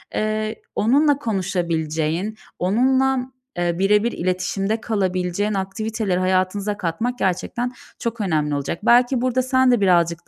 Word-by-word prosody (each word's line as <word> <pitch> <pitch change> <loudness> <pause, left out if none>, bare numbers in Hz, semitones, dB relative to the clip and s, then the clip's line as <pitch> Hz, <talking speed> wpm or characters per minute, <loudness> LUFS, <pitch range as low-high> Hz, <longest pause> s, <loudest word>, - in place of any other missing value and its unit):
eee, 215 0 -2
onunla 285 +6 +3
konuşabileceğin, 175 - -2 0.2
onunla, 260 +6 +2 0.3
eee, 175 0 -1
bire 205 +2 +3
bir 235 - 0
iletişimde 185 +4 -1
kalabileceğin 190 -1 -1
aktiviteleri 200 0 -2
hayatınıza 185 +2 0
katmak 225 +9 -2
gerçekten 215 +6 -1 0.3
çok 235 -1 -3
önemli 155 -6 0
olacak. 140 +4 -3
Belki 245 +2 +4
burada 255 0 +1
sen 260 0 +3
de 240 -4 +2
birazcık 170 -3 +2
205 Hz, 125 wpm, -21 LUFS, 180-235 Hz, 0.3 s, Belki